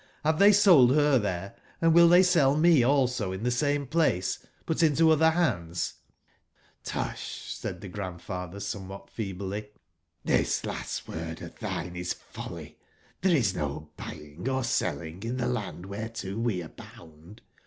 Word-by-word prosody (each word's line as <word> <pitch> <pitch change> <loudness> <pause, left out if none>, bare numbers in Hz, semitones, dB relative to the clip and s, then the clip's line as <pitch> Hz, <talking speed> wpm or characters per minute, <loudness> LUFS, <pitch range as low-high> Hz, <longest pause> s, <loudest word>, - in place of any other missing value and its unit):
Have 155 0 +2
they 200 +1 +8
sold 170 -11 +6
her 145 -3 +4
there, 100 -2 -3 0.3
and 165 -1 +4
will 170 0 +7
they 175 +2 +7
sell 155 -6 +4
me 165 -3 +5
also 125 -6 +1
in 95 +3 -5
the 125 - +1
same 145 +3 0
place, 140 - 0 0.2
but 160 - -1
intoother 160 0 +5
hands 90 - -1 0.9
?'*^^usht"6aidthe6randfather 90 -1 -5
somewhat 100 -1 -7
feebly, 100 0 -5 0.3
'* - - -44
this - - +1
last - - -5
word 80 0 -6
of - - -11
thine 90 +1 -4
is 90 0 -2
folly; - - -10 0.4
there 180 -1 +4
is 110 -8 +1
no 75 -1 -4
buying 75 - -7
or 130 0 0
selling 85 - -2
in 115 +3 -3
the 125 - -1
land 105 -7 -3
whereto 100 0 -5
we 110 -6 -1
are 80 - -9
bound. 80 +5 -15
110 Hz, 145 wpm, -28 LUFS, 90-145 Hz, 0.9 s, they